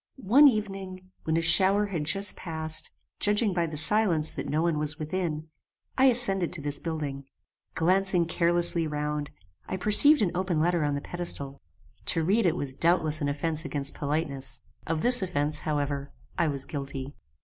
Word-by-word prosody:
One 270 +4 +5
evening, 195 -5 -3
when 160 0 0
a 165 - 0
shower 190 +5 +3
had 170 -7 -4
just 195 +5 0
passed, 160 -2 -2 0.3
judging 205 0 +1
by 170 -2 0
the 155 -1 -6
silence 165 -2 +2
that - - -6
no 155 +2 0
one 165 -3 0
was 150 0 +1
within, 155 -1 -4 0.5
I 265 - +3
ascended 230 -8 +2
to 170 - -4
this 145 0 -2
building. 145 -4 -5 0.5
Glancing 185 +1 +2
carelessly 170 0 +2
round, 150 -1 -3 0.4
I - - -4
perceived 215 +8 +6
an 180 - 0
open 180 -3 -1
letter 170 0 +1
on 145 -1 -1
the 140 - -4
pedestal. 140 -6 -3 0.5
To 165 - +1
read 200 +4 +2
it 165 - +1
was 140 -5 -4
doubtless 160 0 +1
an 145 - -1
offence 155 +2 -2
against 140 -2 -3
politeness. 140 -3 -2 0.3
Of 160 -1 -2
this 245 -1 +6
offence, 155 -5 -1
however, 145 -2 -3 0.2
I 170 - +1
was 140 -2 -3
guilty. 140 -1 -6
165 Hz, 170 wpm, -27 LUFS, 150-185 Hz, 0.5 s, perceived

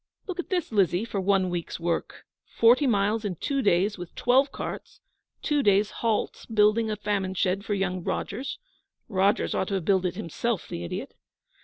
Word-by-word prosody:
Look 370 -3 -6
at 355 - -4
this, 355 -6 -1
Lizzie, 195 -1 +2
for 200 -4 -3
one 190 -1 +2
week's 175 -1 -4
work! 170 0 -3 0.2
Forty 245 +5 +4
miles 210 0 +1
in 200 -4 -2
two 275 - -1
days 200 -1 +2
with 175 -1 -8
twelve 265 +3 +3
carts; - - -7 0.4
two 295 -2 +2
days' 205 -2 +3
halt 225 -2 -2
building 215 +1 +3
a 215 - -1
famine 200 -2 -2
shed 190 +1 0
for 210 -1 -1
young 185 -2 -2
Rogers 245 +10 -3 0.5
(Rogers 200 +1 +1
ought 190 - 0
to 200 - -1
have 185 -4 -2
built 190 -1 +2
it 180 - -1
himself, 215 +3 -3
the 85 - -5
idiot!). 85 - -5
205 Hz, 180 wpm, -26 LUFS, 185-230 Hz, 0.5 s, Forty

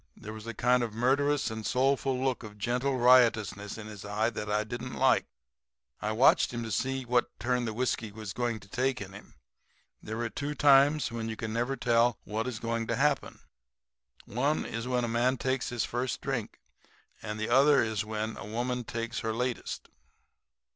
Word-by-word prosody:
There 110 - -8
was 110 +1 -9
a 115 - -5
kind 125 +2 +3
of 115 -3 -3
murderous 135 +3 +2
and 110 0 -5
soulful 135 +2 +1
look 130 -1 0
of 105 -3 -10
gentle 125 +5 0
riotousness 115 -5 +4
in 110 - -8
his 105 -2 -9
eye 105 +3 0
that 105 -1 -5
I 105 +1 +1
didn't 120 +2 -6
like. - - +3 0.7
I 105 - -1
watched 115 +5 +4
him 120 -1 -4
to 110 - -5
see 130 +6 -1
what 120 0 +2
turn 125 0 0
the 110 - -2
whiskey 120 -3 -1
was 105 -2 -7
going 120 -1 -1
to 95 - -15
take 130 +4 0
in 95 -1 -8
him. 105 - -13 0.7
There 110 +1 -5
are 115 - -1
two 145 +1 -4
times 140 0 +5
when 115 -1 -4
you 110 - -3
never 120 +5 -1
can - - -9
tell 120 0 +4
what 110 +3 -3
is 125 -3 -3
going 115 -1 -2
to 115 - 0
happen. 140 +3 0 0.8
One 140 +7 0
is 115 +1 -4
when 125 -1 +1
a - - 0
man 120 +3 +1
takes 130 0 -1
his 120 -1 -1
first 120 +1 -2
drink; 135 -5 -4 0.6
and 105 0 -5
the 110 - -2
other 135 +1 +5
is 110 -1 -1
when 110 +1 -4
a - - -7
woman 125 +2 -2
takes 115 0 -4
her 110 -2 -2
latest. 125 +1 -3
120 Hz, 195 wpm, -29 LUFS, 110-130 Hz, 0.8 s, times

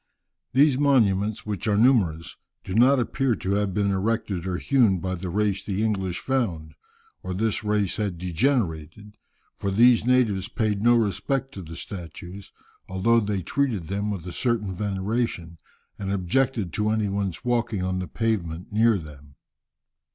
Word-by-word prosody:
] - - -59
These 140 0 +4
monuments, 110 -7 +2
which 105 0 -4
are 105 -1 +2
numerous, 100 -10 +2 0.3
do 95 - -6
not 130 +5 +5
appear 125 0 0
to 95 - -3
have 100 0 +1
been 100 +1 0
erected 95 -2 -1
or 90 -1 -1
hewn 120 -8 +3
by 95 +1 -3
the 90 0 -5
race 100 +1 0
the 100 +1 -2
English 95 -5 -1
found, 90 -13 -2 0.5
or 90 0 -5
this 110 +1 -1
race 105 -3 0
had 100 -5 -2
degenerated; 90 - -1 0.4
for 100 - -3
these 115 +4 +5
natives 115 -6 +2
paid 110 -4 -1
no 120 +2 +5
respect 115 +5 0
to 95 - -7
the 80 -1 -9
statues, 90 +2 -8 0.4
although 100 +5 +3
they 100 -4 -2
treated 110 - -1
them 100 +2 -2
with 95 -5 -4
a 90 - -5
certain 110 -2 -1
veneration, 95 -3 -2 0.4
and 100 -1 -3
objected 100 0 0
to 105 0 0
any 110 -1 +1
one's 100 +2 -3
walking 115 -5 0
on 95 0 -1
the 90 - -4
pavement 90 -7 -2
near 110 0 +4
them. 75 -4 -12
100 Hz, 160 wpm, -25 LUFS, 95-115 Hz, 0.5 s, not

